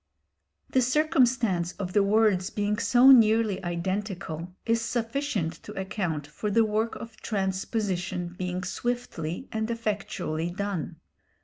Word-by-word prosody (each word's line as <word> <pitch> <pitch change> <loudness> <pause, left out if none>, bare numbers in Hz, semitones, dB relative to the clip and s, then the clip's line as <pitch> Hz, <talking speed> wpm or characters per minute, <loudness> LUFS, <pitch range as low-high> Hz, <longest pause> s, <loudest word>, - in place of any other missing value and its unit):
The 260 - +4
circumstance 245 - +2
of 185 -2 -5
the 205 - +5
words 200 -2 +3
being 210 -1 -1
so 250 +3 +6
nearly 220 -5 +5
identical 180 -1 -3
is 230 0 +2
sufficient 230 - -1
to 210 -1 -7
account 190 -6 -2
for 150 +8 -4
the 225 +2 +4
work 220 +2 0
of 230 -1 -9
transposition 190 -3 -2
being 180 +1 -4
swiftly 240 - -3
and 220 0 -2
effectually 205 -7 -2
done. 190 -3 -3
205 Hz, 120 wpm, -27 LUFS, 180-230 Hz, -, so